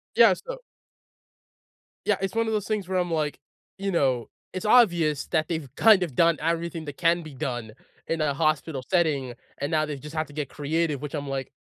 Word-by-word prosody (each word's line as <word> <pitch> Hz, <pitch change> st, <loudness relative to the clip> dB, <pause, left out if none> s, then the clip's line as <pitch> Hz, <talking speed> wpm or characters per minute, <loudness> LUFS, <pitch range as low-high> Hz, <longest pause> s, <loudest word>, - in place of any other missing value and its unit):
Yeah, -, -, +7 dB
so -, -, -7 dB, 1.5 s
Yeah, -, -, +2 dB
it's 195 Hz, +3 st, -2 dB
one 230 Hz, 0 st, +2 dB
of 220 Hz, -, 0 dB
those 210 Hz, -2 st, -1 dB
things 210 Hz, -4 st, -1 dB
where 185 Hz, -1 st, 0 dB
I'm 175 Hz, -1 st, -1 dB
like, 155 Hz, -2 st, -1 dB, 0.4 s
you 195 Hz, 0 st, -1 dB
know, 130 Hz, -8 st, +1 dB, 0.2 s
it's 185 Hz, +2 st, -4 dB
obvious 175 Hz, -, +4 dB
that 155 Hz, -2 st, +1 dB
they've 160 Hz, -5 st, -3 dB
kind 215 Hz, -5 st, +6 dB
of 145 Hz, -8 st, -5 dB
done 170 Hz, -1 st, +4 dB
everything 165 Hz, 0 st, -2 dB
that 145 Hz, -1 st, -7 dB
can 170 Hz, 0 st, +2 dB
be 155 Hz, -, -10 dB
done 120 Hz, -4 st, -4 dB, 0.3 s
in 165 Hz, -1 st, -1 dB
a 145 Hz, -2 st, +1 dB
hospital 155 Hz, -2 st, 0 dB
setting, 150 Hz, -8 st, +1 dB, 0.2 s
and 145 Hz, +4 st, -3 dB
now 155 Hz, -1 st, +2 dB
they've 145 Hz, -2 st, -5 dB
just 150 Hz, +4 st, -10 dB
had 155 Hz, 0 st, -1 dB
to 145 Hz, -, -14 dB
get 150 Hz, -1 st, -3 dB
creative, 150 Hz, 0 st, -1 dB
which 150 Hz, +1 st, -5 dB
I'm 145 Hz, -1 st, -4 dB
like, 135 Hz, -1 st, -4 dB
160 Hz, 205 wpm, -26 LUFS, 145-175 Hz, 1.5 s, Yeah